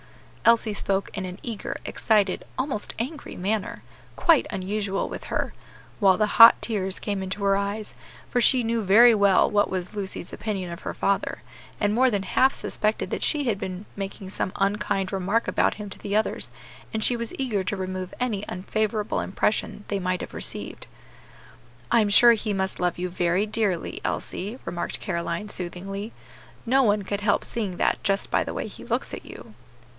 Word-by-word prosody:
Elsie 230 -2 +4
spoke 195 -1 -1
in 190 - -3
an 180 0 -6
eager, 230 -4 -4
excited, 205 -4 +1
almost 260 -6 -2
angry 275 +6 -5
manner, 200 +2 -2 0.3
quite 330 -5 +4
unusual 195 +1 -2
with - - -7
her, - - -2 0.5
while 195 -3 +5
the 215 - +3 0.2
hot 230 - +11
tears 195 -4 -2
came 200 -2 -3
into 190 +2 -4
her 195 0 +4
eyes, 200 +2 -3 0.3
for 245 - +1
she 255 0 +4
knew 230 0 0
very 225 +5 +7
well 200 -3 +4
what 205 0 +2
was 185 +1 -3
Lucy's 190 -3 -5
opinion 195 -5 -3
of 170 - -7
her - - -5
father, 200 0 -1 0.4
and 205 0 +2
more 255 +3 +4
than 205 -4 -1
half 260 +7 +3
suspected 215 +1 -1
that - - -2
she 295 -2 +1
had 225 -7 0
been 185 +2 -5
making 195 -1 -6
some 185 -1 -2
unkind 195 -1 0
remark 195 +4 0
about - - +2
him 210 -1 -7
to - - -6
the 200 0 -3
others, 215 - 0 0.4
and 220 -1 -1
she 245 - +3
was 235 -1 -3
eager 230 -8 -1
to 195 +2 -2
remove 185 -1 -4
any 225 -5 -1
unfavorable 210 +3 -1
impression 205 +1 -1
they 200 - -1
might 180 -1 -1
have - - -7
received. - - -5 1.0
"I 235 - +5
am 210 - +1
sure 235 +3 +8
he 215 -1 -2
must 190 -1 -1
love 180 -1 0
you 180 +1 -2
very 180 +2 +1
dearly, 210 -5 -1
Elsie," 210 +6 -3
remarked 175 - -2
Caroline, 170 +4 -3
soothingly; 195 +4 -5 0.5
"no 265 +3 +4
one 210 -4 +2
could 200 +1 -3
help 205 -1 +2
seeing 205 -6 -3
that - - +1
just 195 0 0
by - - +3
the - - -6
way - - -3
he - - -11
looks - - -2
at - - -6
you." - - -11
205 Hz, 180 wpm, -25 LUFS, 190-220 Hz, 1.0 s, hot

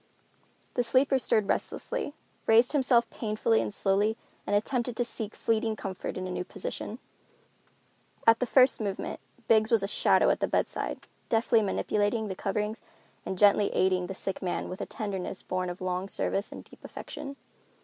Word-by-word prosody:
The 245 - +1
sleeper 260 +3 +3
stirred 215 -4 +2
restlessly, 310 - -2 0.3
raised 230 +2 +6
himself 255 -5 +4
painfully 210 - +1
and 110 -2 -3
slowly, 205 - +1 0.3
and 205 - +1
attempted 240 +3 0
to 245 - +1
seek 220 -2 -6
fleeting 225 -1 0
comfort 190 -3 -5
in 185 - -3
a 185 - -4
new 180 - -2
position. - - -6 1.3
At 225 0 +6
the 250 - 0
first 255 -2 +5
movement 200 -2 -3 0.3
Biggs 220 -1 +4
was 225 -4 +4
a - - 0
shadow - - +4
at - - 0
the - - +1
bedside, - - -2 0.2
deftly 225 0 +3
manipulating 210 +1 0
the 190 - -3
coverings 210 +2 -2 0.5
and 190 - -3
gently 205 +1 +5
aiding 185 -1 +2
the 195 - -5
sick 195 0 -3
man 180 - -2
with 185 - -6
a - - -3
tenderness 195 -3 -4
born 185 0 -2
of 175 +1 -7
long 185 +1 -2
service 200 0 -1
and - - -8
deep - - -18
affection. 275 0 -7
210 Hz, 170 wpm, -29 LUFS, 190-230 Hz, 1.3 s, raised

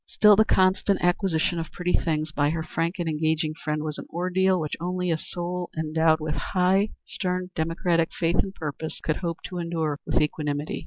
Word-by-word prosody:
Still 210 -1 +6
the 220 +2 +5
constant 190 +1 +3
acquisition 175 -2 +1
of 165 - -5
pretty 180 0 -2
things 155 -1 0
by 145 -1 +1
her 160 +1 -2
frank 165 +2 -2
and 175 -2 -2
engaging 155 0 0
friend 150 -1 -3
was 155 -1 -4
an - - -8
ordeal 185 +2 +1
which 155 -2 -2
only 180 +1 -1
a - - +3
soul 175 +1 -4
endowed 160 0 +2
with 155 -1 -2
high, 190 +3 +2 0.2
stern 180 -1 -3
democratic 165 +1 +1
faith 170 0 0
and 195 0 -1
purpose 155 +1 -5
could 155 - -1
hope 170 -2 -4
to 180 -2 -5
endure 160 -4 -2
with - - +2
equanimity. 150 -1 -1
165 Hz, 190 wpm, -26 LUFS, 155-180 Hz, 0.2 s, Still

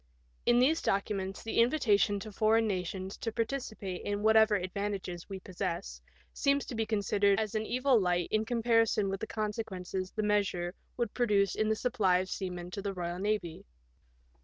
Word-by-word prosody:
In 240 - +5
these 275 +6 +4
documents 195 -1 -1
the 225 - -1
invitation 225 -5 +3
to 215 - -7
foreign 220 +2 +3
nations 190 -1 -3
to 225 - -3
participate 220 -6 -3
in 205 0 -3
whatever 220 -1 +5
advantages 185 -1 -4
we 195 -1 -5
possess 170 - -4 0.3
seems 280 0 +1
to - - -7
be 225 -1 -1
considered 200 -1 +2
as 215 -2 -2
an 215 0 -1
evil 255 -1 +3
light 175 -2 +1
in 215 0 +2
comparison 230 -3 +2
with 195 0 -3
the 220 - -4
consequences 195 -4 -3
the 215 - -3
measure 200 -4 0 0.2
would 235 -4 -1
produce 205 -5 +2
in 215 0 0
the 220 - +2
supply 215 -7 +2
of 185 +1 -2
seamen 180 -2 -5
to 200 - -5
the 200 -1 -3
Boyal 175 0 -3
Navy. 205 -5 -2
205 Hz, 170 wpm, -31 LUFS, 190-220 Hz, 0.3 s, In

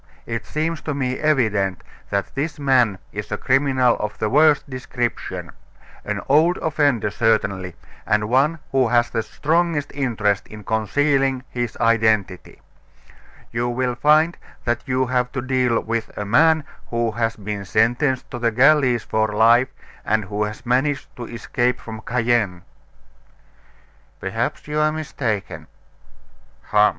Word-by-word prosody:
It 115 -2 -4
seems 155 +1 -2
to 150 - -3
me 130 -2 -2
evident 110 -11 +1 0.3
that 100 0 -2
this 145 +2 -3
man 130 -8 +3
is - - -6
a - - -1
criminal 130 -2 +2
of 105 0 -4
the 105 - -1
worst 150 +1 +4
description 125 -3 -4 0.5
an - - -3
old 160 +6 +4
offender 145 -9 +1
certainly, 100 -5 0 0.3
and 105 -1 +2
one 135 +7 +2
who 130 -2 +3
has 120 +1 +2
the 115 - 0
strongest 155 +3 0
interest 110 -8 0
in 105 -1 -11
concealing 135 +5 +1
his 120 -2 -3
identity. 110 -5 +1 0.9
You 120 +1 -1
will 125 +1 -1
find 155 +6 +3 0.3
that 120 -1 0
you 130 0 +1
have 125 0 0
to 135 - -2
deal 130 -3 +1
with 115 0 -3
a 105 - -3
man 155 +8 +4 0.2
who 115 -1 -1
has 115 0 -1
been 105 -1 -5
sentenced 120 +7 +1
to 120 - -5
the 115 -1 +2
galleys 125 0 +4
for 110 0 0
life, 115 +4 +4 0.3
and 110 0 0
who 105 +2 -2
has 105 +4 -8
managed 135 +3 0
to 120 - -5
escape 120 +1 -1
from 110 -1 -8
Cayenne." 115 -7 0 1.6
"Perhaps - - -3
you 150 0 -1
are 155 0 +3
mistaken." 110 - -4 1.0
"Hum! 105 0 +5
120 Hz, 140 wpm, -21 LUFS, 110-140 Hz, 1.6 s, Hum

